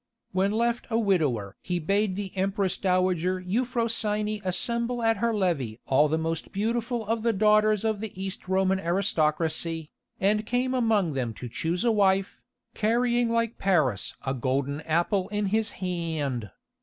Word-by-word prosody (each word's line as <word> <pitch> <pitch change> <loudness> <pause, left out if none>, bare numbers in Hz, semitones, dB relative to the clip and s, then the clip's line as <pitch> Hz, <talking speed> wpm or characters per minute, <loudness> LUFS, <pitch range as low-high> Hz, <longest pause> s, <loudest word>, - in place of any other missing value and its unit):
When 190 +1 +2
left 235 +2 0
a 225 - +1
widower 150 - 0
he 180 -1 -2
bade 195 +4 0
the 195 -1 -5
Empress 195 0 0
dowager 185 -1 +1
Euphrosyne 215 0 0
assemble 235 +6 0
at 225 -1 +3
her 235 +3 +1
levée 165 - -1
all 140 +3 +4
the 160 +2 0
most 165 0 -3
beautiful 230 +3 -1
of 225 +2 -1
the 230 +1 +2
daughters 215 0 +3
of 220 -2 0
the 220 -2 -4
East 190 -1 -5
Roman 190 0 +2
aristocracy, 165 -2 0 0.3
and 210 +2 +2
came 250 +1 0
among 220 - +2
them 120 -4 -2
to 125 - -7
choose 170 - -2
a 235 - +4
wife, 195 -2 +2 0.3
carrying 240 +2 +1
like 230 0 0
Paris 155 - +1
a 135 - 0
golden 135 +3 -1
apple 175 +4 +1
in 210 -1 -1
his 220 0 +1
hand. 155 - -2
195 Hz, 155 wpm, -27 LUFS, 165-220 Hz, 0.3 s, all